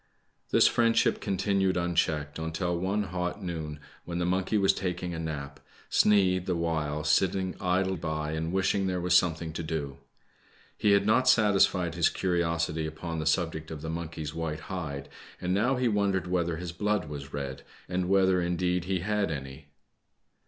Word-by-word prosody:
This - - +5
friendship 115 -1 +3
continued 95 -1 +1
unchecked 80 -4 0
until 80 +2 -2
one 95 +4 0
hot 90 +1 -3
noon, 80 -4 -4 0.2
when' 85 0 -5
the 90 - 0
monkey 95 +4 +1
was 95 -1 +4
taking 90 -2 -3
a 80 - -4
nap, 75 -3 -5 0.3
Sneid, 95 -3 +3
the 90 - +1
while, 80 -3 -1
sitting 95 +4 +1
idle 95 +1 +1
by 80 -2 -3
and 80 +1 -2
wishing 95 +1 +1
there 90 -1 -1
was 90 0 0
some 85 -2 +5
thing 80 0 -6
to 80 - -4
do. 75 -4 -4 0.8
He 105 - +3
had 100 0 +3
not 125 +4 +4
satisfied 95 -6 +3
his 85 -1 +3
curiosity 85 -3 0
upon 80 +1 -5
the 80 - -2
subject 80 -1 0
of 80 -1 -7
the 80 - -3
monkey's 80 -2 -5
white 80 -2 -3
hide, 75 -6 -5 0.3
and 90 0 -1
now 120 +7 +2
he 125 -1 +1
wondered 100 -4 +1
whether 85 -2 0
his 85 0 -5
blood 105 0 -1
was 70 -2 -7
red, 70 -2 -5 0.3
and 90 0 -1
whether, 95 -2 +4
indeed, 90 0 0
he 95 -1 -1
had 105 0 0
any. 70 -2 -6
85 Hz, 170 wpm, -28 LUFS, 80-95 Hz, 0.8 s, This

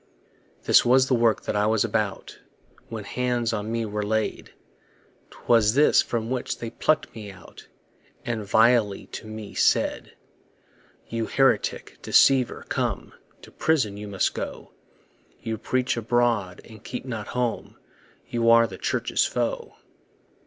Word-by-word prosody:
This - - +5
was 130 +2 +4
the 130 - +1
work 115 -2 +1
I 105 0 +1
was 110 -1 +2
about - - -3 0.5
When 110 -2 -6
hands 120 +1 -1
on 105 +1 -3
me 115 0 -1
were 105 0 -3
laid; 110 +1 -2 0.8
'Twas 115 -1 +2
this 150 +2 +5
from 115 0 -3
which 130 -1 -3
they 115 -1 -6
pluck'd 155 0 0
me 105 -3 -8
out 95 -3 -15 0.6
And 115 -3 -3
vilely 110 0 +3
to 110 - -8
me 110 -1 -8
said: - - +1 0.9
You 115 -1 -3
heretic, 135 -1 0
deceiver, 130 -3 +3
come, - - -3 0.3
To - - -13
prison 135 -11 0
you 105 +1 -8
must 100 -2 0
go; - - -7 0.7
You 110 -2 -5
preach 130 +2 -1
abroad, 115 -5 0
and 110 -1 -14
keep 125 +1 -6
not 110 -5 -5
home, 120 -2 -2 0.5
You 115 -1 +1
are 115 0 +6
the 95 -4 -9
Church's - - 0
foe. - - -3
115 Hz, 140 wpm, -25 LUFS, 105-120 Hz, 0.9 s, are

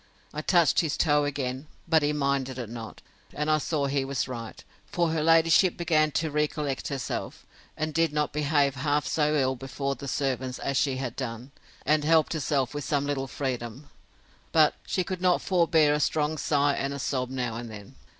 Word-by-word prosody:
I 150 - -3
touched 170 0 +3
his 155 -3 0
toe 145 -2 +3
again; 135 0 -3 0.2
but 160 -1 +4
he 145 0 +1
minded 140 -3 -1
it 120 -4 -5
not; 115 -2 -8 0.3
and 150 +1 0
I 155 - +3
saw 150 -1 -1
he 140 0 0
was 135 -1 -2
right; 115 -3 -7 0.2
for 170 -2 0
her 160 -1 0
ladyship 165 +3 +4
began 155 -3 +2
to 160 -1 0
recollect 150 -2 -1
herself, 135 -3 -4 0.3
and 155 0 -2
did 165 -1 +2
not 150 0 -1
behave 145 -2 +2
half 145 +2 0
so 150 -1 +1
ill 130 -2 +1
before 135 +1 -3
the 140 0 -8
servants, 130 -2 -2
as 140 - -3
she 135 -1 +1
had 130 -2 -4
done; 125 0 -6 0.3
and 150 +1 +3
helped 160 +1 +3
herself 140 -4 0
with 145 -1 -4
some 145 -1 0
little 140 -2 -2
freedom; 130 +1 -5 0.6
but 155 -2 +5
she 185 - 0
could 185 0 -5
not 180 -1 +3
forbear 165 -5 +3
a 150 - +1
strong 150 0 +1
sigh 145 -1 +1
and 140 0 -2
a - - -4
sob 130 -2 -2
now 125 -3 -2
and 120 0 -6
then. 105 -2 -10
145 Hz, 190 wpm, -27 LUFS, 130-155 Hz, 0.6 s, but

